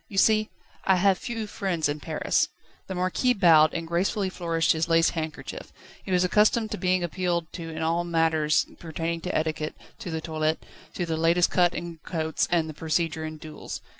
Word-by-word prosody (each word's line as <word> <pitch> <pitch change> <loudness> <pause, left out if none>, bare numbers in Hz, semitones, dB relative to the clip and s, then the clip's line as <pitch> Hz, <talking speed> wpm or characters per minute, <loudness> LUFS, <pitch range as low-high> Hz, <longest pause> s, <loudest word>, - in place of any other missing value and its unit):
You 195 - -8
see, 215 +1 +4 0.3
I 190 - +4
have 190 0 +3
few 230 -3 -4
friends 185 -6 -1
in 145 +1 -3
Paris." - - 0 0.4
The 190 - -4
Marquis 185 +8 +1
bowed, 165 -6 +6
and 165 - -3
gracefully 190 +3 0
flourished 165 -4 +1
his 160 +1 0
lace 165 0 +4
handkerchief. 155 -2 -6 0.3
He - - -6
was 180 0 +3
accustomed 215 +4 +3
to 210 - -3
being 185 -1 +1
appealed 175 -1 -2
to 165 -2 -6
in 160 0 -4
all 165 +2 +1
matters 160 -3 +2
pertaining 165 0 -3
to 180 - -1
etiquette, 155 -1 -2 0.2
to - - -6
the 160 -1 -2
toilet, 155 0 -2 0.3
to 175 - -1
the 165 -1 -2
latest 170 +2 +3
cut 175 -1 +3
in 170 -1 -6
coats, 160 -3 -1
and 170 -2 +2
the 155 - -6
procedure 160 +1 -1
in 155 0 -5
duels. 155 0 -8
170 Hz, 190 wpm, -26 LUFS, 160-185 Hz, 0.4 s, bowed